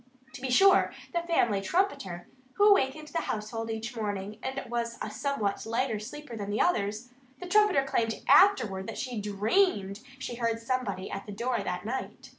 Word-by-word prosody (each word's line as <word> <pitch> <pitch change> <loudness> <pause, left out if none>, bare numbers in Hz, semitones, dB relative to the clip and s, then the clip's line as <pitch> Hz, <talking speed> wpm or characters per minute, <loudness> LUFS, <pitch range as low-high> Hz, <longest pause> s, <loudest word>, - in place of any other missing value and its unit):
To 250 - -9
be 265 - -3
sure, 385 +9 +5 0.2
the 345 - +1
family 240 - +1
trumpeter 195 - -1 0.3
who 410 +1 +5
awakened 305 -4 +2
the 330 - -1
household 225 -3 -4
each 225 +2 -4
morning 205 -1 -4
and 265 +1 -3
was 235 0 -3
a 210 - -4
somewhat 220 -3 -2
lighter 230 0 -1
sleeper 250 +4 -8
than 205 -2 -5
the 205 - -1
others 215 - 0 0.3
the - - -7
trumpeter 410 -6 +4
claimed 225 -4 -1
afterward 220 - +5
that - - -6
she 245 -5 -3
DREAMED 205 - +1
that 260 +3 -14
she 240 - -5
heard 230 -1 0
somebody 230 -5 -2
at 195 +1 -6
the - - -6
door 235 +4 -1
that 180 +2 -4
night. 255 +4 -5
235 Hz, 180 wpm, -29 LUFS, 210-275 Hz, 0.3 s, sure